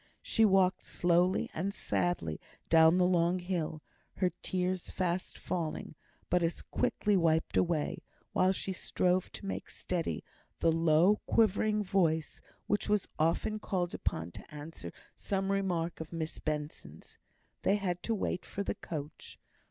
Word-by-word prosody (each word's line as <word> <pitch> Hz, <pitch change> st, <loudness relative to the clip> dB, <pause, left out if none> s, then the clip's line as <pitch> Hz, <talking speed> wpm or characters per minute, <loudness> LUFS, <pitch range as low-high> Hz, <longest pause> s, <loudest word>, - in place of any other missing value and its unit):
She 225 Hz, -, +3 dB
walked 190 Hz, -2 st, +3 dB
slowly 175 Hz, +1 st, +2 dB
and 190 Hz, +5 st, -1 dB
sadly 175 Hz, -, -1 dB, 0.3 s
down 160 Hz, +1 st, +7 dB
the 180 Hz, -, +4 dB
long 175 Hz, 0 st, +3 dB
hill, 175 Hz, -4 st, -3 dB, 0.3 s
her 185 Hz, -1 st, +1 dB
tears 185 Hz, 0 st, -1 dB
fast 180 Hz, -1 st, -2 dB
falling, 165 Hz, -4 st, -3 dB, 0.3 s
but 180 Hz, 0 st, +2 dB
as 165 Hz, 0 st, -1 dB
quickly 205 Hz, -1 st, +1 dB
wiped 165 Hz, -3 st, +2 dB
away; 165 Hz, -4 st, +1 dB, 0.3 s
while 185 Hz, +1 st, +4 dB
she 190 Hz, 0 st, -2 dB
strove 180 Hz, 0 st, 0 dB
to -, -, -8 dB
make 195 Hz, -, -4 dB
steady 175 Hz, -3 st, -3 dB, 0.3 s
the 165 Hz, -, +3 dB
low 165 Hz, +5 st, +4 dB
quivering 215 Hz, -1 st, +3 dB
voice 170 Hz, -5 st, +1 dB, 0.2 s
which 205 Hz, 0 st, 0 dB
was 210 Hz, -2 st, +2 dB
often 170 Hz, +7 st, +1 dB
called 180 Hz, -4 st, -1 dB
upon 85 Hz, -2 st, -2 dB
to -, -, -12 dB
answer 150 Hz, -, -7 dB, 0.2 s
some 195 Hz, 0 st, -1 dB
remark 180 Hz, -4 st, 0 dB
of 160 Hz, -1 st, -7 dB
Miss 165 Hz, -1 st, -4 dB
Benson's. 150 Hz, -, -5 dB, 0.4 s
They 200 Hz, -, +3 dB
had 180 Hz, -4 st, -2 dB
to 230 Hz, -, 0 dB
wait 185 Hz, -3 st, -2 dB
for 200 Hz, -, -4 dB
the -, -, -1 dB
coach. 150 Hz, -2 st, -7 dB
180 Hz, 145 wpm, -32 LUFS, 160-190 Hz, 0.4 s, down